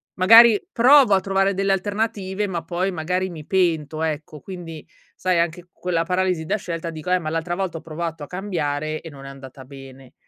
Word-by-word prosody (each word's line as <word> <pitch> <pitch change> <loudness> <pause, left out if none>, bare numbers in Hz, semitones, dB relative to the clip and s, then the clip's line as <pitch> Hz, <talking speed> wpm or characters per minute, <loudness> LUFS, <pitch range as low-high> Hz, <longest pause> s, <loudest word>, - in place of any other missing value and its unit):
magari, 225 +3 +7
provo 260 -1 +6
a - - +3
trovare 195 +1 +1
delle 195 +1 0
alternative, 205 0 -2
ma, 175 -3 -4
poi, 180 +3 -2
magari, 180 +2 -2
mi 160 -4 -9
pento, 160 -4 0
ecco. 155 -1 -4
Quindi, 170 -4 -9 0.3
sai, 185 -2 0
anche 170 +1 -2
quella 170 -2 -2
paralisi 180 -2 -1
da 205 +6 0
scelta, 170 -4 -5
dico: 155 +2 -7
"Eh, 185 - +3
ma 155 -3 -4
l'altra 165 +2 -2
volta 185 -3 -3
ho - - -16
provato 165 -1 -5
a - - -8
cambiare, 155 -5 -3
e 165 - -9
non 135 -2 -12
è - - -8
andata 135 -1 -12
bene." 135 -1 -13
175 Hz, 195 wpm, -22 LUFS, 155-190 Hz, 0.3 s, magari